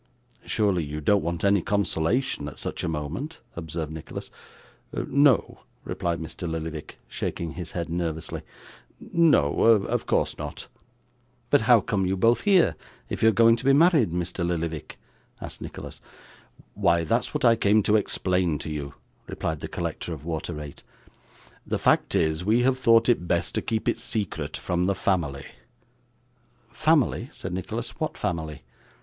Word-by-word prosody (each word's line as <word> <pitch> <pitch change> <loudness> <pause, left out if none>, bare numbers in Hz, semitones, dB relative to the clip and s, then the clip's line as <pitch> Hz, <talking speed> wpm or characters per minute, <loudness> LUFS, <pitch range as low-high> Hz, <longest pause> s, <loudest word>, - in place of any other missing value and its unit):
'Surely 100 -6 +1
you 75 +1 -5
don't 100 +6 +3
want 85 0 -3
any 100 -1 +4
consolation 100 - 0
at 75 - -8
such - - -4
a - - -1
moment?' 85 - -4 0.2
observed 80 -1 -5
Nicholas. 80 -1 -8 0.6
'No,' 140 -4 +2 0.2
replied 85 -1 -2
Mr. 80 +1 -6
Lillyvick, 80 -1 -5
shaking 85 -2 -4
his 85 -1 -7
head 85 -1 -3
nervously: 85 -2 -3 0.6
'no 155 - +3
of 110 -3 +3
course - - 0
not.' - - -6 0.9
'But - - +5
how 120 -3 +8
come 95 -2 0
you 95 +1 0
both 115 +5 +3
here, 185 - +4 0.3
if - - -4
you're 110 - +6
going 115 +2 +5
to - - -8
be 135 +1 +5
married, 155 - +5
Mr 90 +1 -2
Lillyvick?' 85 -3 -3 0.4
asked - - -8
Nicholas. - - -8 0.7
'Why, 85 0 +2
that's 80 - 0
what - - +1
I 115 - +6
came 105 -1 +3
to 105 - +3
explain 90 -5 +1
to 80 - -6
you,' 70 -2 -5 0.3
replied 80 -1 -3
the - - -5
collector 85 - -4
of 75 -1 -9
water 80 -2 -3
rate. 75 -1 -9 0.8
'The - - 0
fact - - +2
is, 80 +2 +1
we 110 +5 +3
have 130 0 +2
thought 115 -2 +5
it 115 -8 +2
best - - 0
to - - 0
keep 110 -1 -2
it - - +1
secret 85 -9 -3
from 90 0 -1
the 100 - +1
family.' 75 -9 -1 1.3
'Family!' 155 -5 +2
said 95 - -6
Nicholas. 90 -1 -4
'What - - -2
family? 80 -3 -3
90 Hz, 155 wpm, -26 LUFS, 80-115 Hz, 1.3 s, how